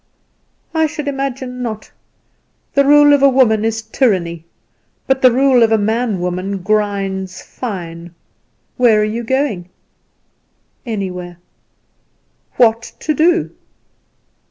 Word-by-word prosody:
"I 320 -1 +2
should 300 -1 -6
imagine 270 -2 -4
not. 220 -3 -6 0.8
The 280 - +4
rule 290 0 +6
of 285 - +3
a 275 - +6
woman 240 -5 +3
is 225 0 -2
tyranny; 185 - -1 0.6
but 265 0 0
the 255 - +6
rule 260 0 +3
of 225 -1 +4
a 220 - +4
man 220 -1 -1
woman 180 +2 -3
grinds 195 -2 -2
fine. 175 -7 -7 0.6
Where 235 -4 +4
are - - +2
you 220 +3 -3
going?" 230 -8 -1 1.2
"Anywhere." 180 -5 -5 1.2
"What 230 -1 +2
to 310 - 0
do?" 340 +5 +2
225 Hz, 115 wpm, -16 LUFS, 195-265 Hz, 1.2 s, rule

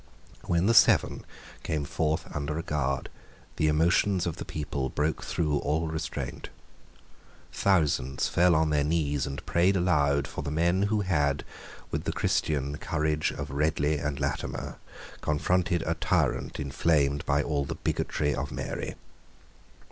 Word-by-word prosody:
When 85 +1 +1
the 115 - +4
Seven 115 - +5 0.4
came 75 -2 -2
forth 80 0 -1
under 75 +1 -2
a 80 - -3
guard, 70 -5 -1 0.5
the 75 - +2
emotions 85 +4 +3
of 85 -3 -3
the - - -6
people 70 -3 -3
broke 75 +5 -1
through 75 -3 0
all 80 +3 0
restraint. 80 0 -4 1.0
Thousands 75 -8 +1
fell 90 0 +4
on 80 0 +2
their 75 -1 +2
knees 75 -3 0
and 70 +1 -6
prayed 90 +3 +3
aloud 70 -6 +2
for - - -5
the - - -4
men 85 +5 +2
who 105 -1 +1
had, 75 -7 +1 0.5
with - - -2
the - - 0
Christian, 70 -1 0
courage 75 -1 0
of - - -6
Ridley 75 +1 +1
and 70 -1 -3
Latimer, - - -3 0.4
confronted 85 +2 +1
a 80 - +1
tyrant 80 - 0
inflamed 70 0 +1
by 70 0 +2
all 70 -2 0
the - - -4
bigotry 75 -1 -1
of 70 +2 -3
Mary. - - -4
75 Hz, 145 wpm, -28 LUFS, 70-85 Hz, 1.0 s, Seven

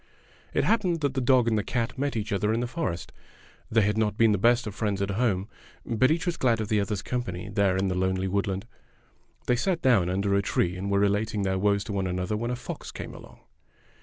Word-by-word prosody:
It - - +1
happened 185 -8 +1
that 140 -3 0
the 135 - -1
dog 125 -1 +4
and 110 -3 +2
cat 115 -2 -1
met 140 0 -2
each 105 -1 -2
other 105 +2 +1
in 115 - +1
the 120 - -1
forest. 120 - -3 0.6
They 110 0 +3
had 105 +2 +1
not 105 -1 0
been 115 -1 +5
the 100 - +1
best 120 +3 +3
of 105 - -5
friends 105 -2 -1
at 100 0 -1
home, 100 -3 0 0.4
but 120 +3 +2
each 160 +2 +1
was 175 -2 -1
glad 120 -3 +2
of 110 -1 -3
the 110 -2 +2
other's 100 0 -2
company 110 -6 -4
there 100 -2 +2
in 95 +1 +1
the 95 - 0
lonely 95 +1 0
woodland. 95 0 -1 0.8
They 125 - +3
sat 165 +8 0
down 105 -9 +4
under 100 +2 0
a 100 - +3
tree 90 -2 0
and 95 +2 -4
were 100 - +2
relating 105 +1 +1
their 95 -1 0
woes 100 0 +2
to 105 - -5
one 95 -1 -1
another 90 +3 -2
when 120 +3 -2
a 125 - -1
fox 125 - -7
came - - -7
along. - - -13
105 Hz, 235 wpm, -27 LUFS, 100-120 Hz, 0.8 s, been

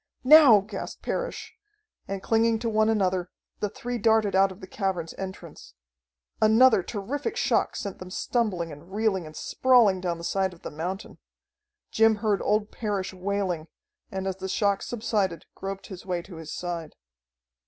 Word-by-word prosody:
"Now!" 265 -6 +8
gasped 200 0 -7
Parrish, - - -4 0.5
and, 195 0 -4
clinging 225 0 +3
to 230 +1 -2
one 215 0 +3
another, 185 -4 +1 0.3
the 210 - -1
three 245 +3 -5
darted 220 -2 +3
out 195 0 +4
of 190 - -11
the 190 - -9
cavern's 185 -4 -3
entrance. 190 - -9 0.7
Another 220 0 +6
terrific 275 - -4
shock - - +1
sent 200 -2 -5
them 185 - -8
stumbling 185 -5 -1
and 150 +5 -12
reeling 200 -5 0
and 155 - -12
sprawling 230 -6 +3
down 175 -2 -2
the 170 - -10
side 190 +1 0
of 170 - -23
the - - -6
mountain. 180 +7 -5 0.7
Jim 225 0 +4
heard 210 -1 0
old 210 0 +1
Parrish 200 -4 -3
wailing, 185 -3 -2 0.4
and, 190 0 -4
as 190 -1 -2
the 190 0 -5
shock 200 0 +1
subsided, 205 -7 -2
groped 195 0 -6
his 190 -2 -9
way 180 -2 -3
to 180 -3 -11
his 160 -1 -8
side. 170 -3 -5
195 Hz, 165 wpm, -26 LUFS, 185-220 Hz, 0.7 s, Now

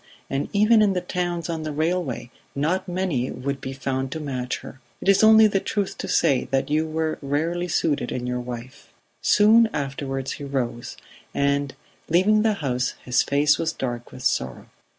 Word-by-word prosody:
and 135 +1 -1
even 215 +2 +5
in 205 -2 +3
the 180 - 0
towns 175 -2 -2
on 165 -2 -3
the 155 -1 -4
railway, 155 -5 -2 0.2
not 175 +7 0
many 175 -9 -1
would 135 +1 -4
be 130 - -5
found 135 0 -3
to 160 - -4
match 130 -4 -3
her. 135 - -11 0.2
It - - -7
is 195 +2 +5
only 220 0 +8
the 200 -2 +2
truth 200 0 -2
to - - -4
say 130 -2 +2
that 135 +1 0
you 155 +1 +1
were 160 0 -2
rarely 160 +5 -1
suited 155 -3 0
in 125 -1 -3
your 125 0 -2
wife... 125 +2 -8 0.3
Soon 220 +2 +5
afterwards 135 -2 -3
he 145 - -6
rose, 125 -4 -3 0.4
and, 140 -1 0 0.3
leaving 195 +6 +4
the 220 0 +2
house, 125 -1 -1
his 125 -1 +3
face 145 +1 +2
was 160 - -1
dark 120 -2 -5
with 130 - -10
sorrow. 65 -1 -1
145 Hz, 180 wpm, -24 LUFS, 130-180 Hz, 0.4 s, only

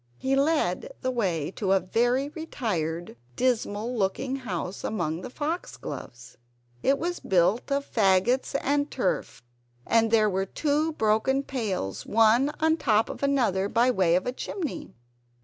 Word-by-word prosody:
He 265 - 0
led 320 - +1
the 255 - 0
way 180 - -1
to 195 -1 0
a 195 - +4
very 240 +9 +1
retired, 180 - -3 0.2
dismal 235 -2 0
looking 250 +6 -1
house 190 -6 -5
amongst 170 -5 -2
the - - -7
foxgloves. 255 - -6 0.4
It 275 - +3
was 350 +3 -3
built 190 +8 +1
of 280 0 0
faggots 220 +6 +2
and 285 +1 +1
turf, 185 - -2 0.4
and 225 -1 +3
there 215 -1 +4
were 195 -1 -1
two 305 +6 0
broken 220 +3 +1
pails, 210 - -3
one 230 +6 +4
on 320 0 +3
top 220 -7 +2
of - - -9
another, 235 -9 +1
by 240 +4 +3
way 185 -7 +3
of 185 - 0
a 250 - -1
chimney. 320 +4 -5
230 Hz, 145 wpm, -26 LUFS, 190-275 Hz, 0.4 s, a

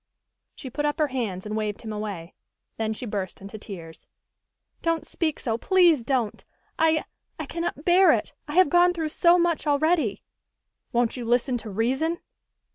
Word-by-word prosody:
She 260 -4 -8
put 295 - -2
up 295 0 0
her 305 -2 +1
hands, 215 -8 -3
and 210 0 -4
waved 215 -1 -3
him 220 -1 -5
away. 200 -5 -5 0.4
Then 220 -1 -1
she 220 +3 -5
burst 200 -4 -4
into 200 +2 -9
tears. 170 -6 -10 0.7
"Don't 330 -1 0
speak 315 -3 -2
so, 230 -2 -2
please 350 -6 +4
don't! 235 -3 -1 0.4
I 320 -1 +3 0.3
I - - -4
cannot 335 -3 -4
bear 365 +2 +6
it, - - -1
I 295 - -5
have 370 -4 +6
gone 355 0 +5
through 320 -2 -2
so 340 +3 +4
much 340 -3 0
already!" 290 - +1 0.7
"Won't 240 0 +1
you 245 - -4
listen 245 +2 +1
to 225 - -7
reason?" 265 - 0
260 Hz, 170 wpm, -25 LUFS, 215-325 Hz, 0.7 s, bear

